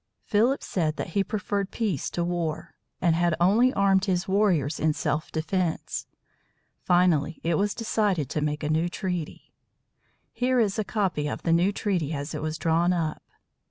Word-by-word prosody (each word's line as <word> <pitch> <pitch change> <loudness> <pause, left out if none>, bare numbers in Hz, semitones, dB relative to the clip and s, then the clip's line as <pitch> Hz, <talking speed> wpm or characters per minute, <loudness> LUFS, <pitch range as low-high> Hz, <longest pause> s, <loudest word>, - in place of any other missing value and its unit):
Philip 235 +6 +2
said 160 -4 -1
that - - -4
he 200 +3 +2
preferred 200 -2 -2
peace 205 - -2
to 175 - -2
war, 170 -1 -3 0.3
and 170 -3 +3
had 170 -1 +2
only 215 +9 +4
armed 195 -3 +3
his 180 -3 0
warriors 185 -8 +2
in 155 -1 +2
self 150 +1 -2
defense. 165 +2 -2 0.7
Finally, 175 -4 +2
it 170 - +1
was 205 +4 0
decided 210 - 0
to 155 - -1
make 150 +1 -2
a 150 - -1
new 160 +3 +1
treaty. 180 -4 -5 0.8
Here 255 0 +1
is 210 -2 +1
a - - +1
copy 190 -9 -1
of - - -5
the 165 - +2
new 175 +4 +3
treaty 180 -7 -1
as 145 +1 -4
it - - -4
was 155 0 -3
drawn 165 +2 +2
up. 165 -3 -1
175 Hz, 170 wpm, -26 LUFS, 160-200 Hz, 0.8 s, only